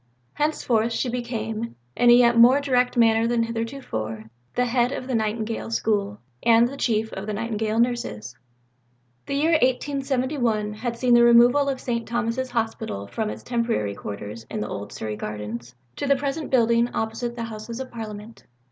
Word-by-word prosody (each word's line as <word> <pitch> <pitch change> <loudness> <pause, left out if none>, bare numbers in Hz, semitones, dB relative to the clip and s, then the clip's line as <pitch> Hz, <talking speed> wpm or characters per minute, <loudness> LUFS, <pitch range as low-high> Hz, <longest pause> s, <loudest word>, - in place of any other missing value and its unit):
Henceforth 235 -7 0
she 245 - -1
became, 230 -2 -4 0.2
in 240 - +4
a - - +9
yet 240 -1 +6
more 245 +4 +7
direct 250 -3 +1
manner 225 -1 +4
than 235 -1 +1
heretofore, 225 - -4 0.2
the 250 - +2
head 245 0 +1
of 255 - -4
the 260 - -4
Nightingale 220 0 -2
School, 205 -3 0 0.2
and 230 0 +5
the 270 - -7
Chief 220 -4 0
of 195 +2 -6
the 215 - -2
Nightingale 220 0 -2
Nurses. 235 - -1 0.9
The 275 - -2
year 310 +4 +2
1871 260 -5 0
had 235 +2 -4
seen 245 0 +2
the 240 - +7
removal 240 +4 +6
of 265 -2 -2
St. 235 -2 -3
Thomas's 240 +2 -1
Hospital 225 - -3
from 215 - -3
its - - -7
temporary 230 - -1
quarters 105 +2 -7
in - - -4
the 105 - -3
old 100 -1 -6
Surrey 110 -1 -4
Gardens 110 +3 -6 0.2
to 285 - -2
the 280 - +5
present 285 +3 -3
building 235 -1 +3
opposite 225 +2 -2
the 235 - -4
Houses 230 +1 -7
of 260 -1 -6
Parliament. 220 -1 -8
230 Hz, 170 wpm, -24 LUFS, 215-245 Hz, 0.9 s, a